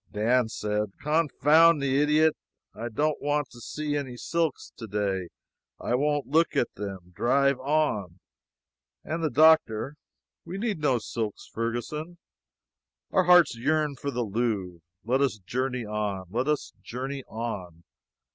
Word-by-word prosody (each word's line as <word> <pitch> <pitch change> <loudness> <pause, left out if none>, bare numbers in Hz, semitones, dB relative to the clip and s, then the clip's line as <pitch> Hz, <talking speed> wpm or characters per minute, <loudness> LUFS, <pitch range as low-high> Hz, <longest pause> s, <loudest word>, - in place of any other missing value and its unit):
Dan 115 +3 +2
said, 105 -2 -2
"Confound 155 +1 +4
the 140 0 +2
idiot! 155 +1 +4 0.4
I 115 +2 -5
don't 150 +6 0
want 145 -2 0
to 120 -1 -13
see 150 +4 -3
any 130 -4 -4
silks 165 +1 -2
today, 100 -4 -2
and - - -24 0.5
I - - -2
won't 145 +2 +1
look 160 +4 +2
at - - +1
them. 95 -3 -7
Drive 140 +6 +2
on." 130 - 0 0.8
And 165 +1 -3
the 155 - +2
doctor: 145 -4 +4 0.5
"We 175 +3 -6
need 210 -4 -2
no 140 -4 +2
silks 110 -2 -4
now, - - -33
Ferguson. 120 +9 -3 0.9
Our 185 - +3
hearts 175 -6 +6
yearn 150 +4 0
for 140 - -4
the 125 -3 -1
Louvre. 105 -5 -2 0.2
Let 130 +4 +1
us 130 -6 +1
journey 125 +5 -3
on 105 -3 -3
let 125 +5 -1
us 150 -1 -1
journey 135 +3 -5
on." 95 -7 -6
130 Hz, 145 wpm, -27 LUFS, 110-150 Hz, 0.9 s, hearts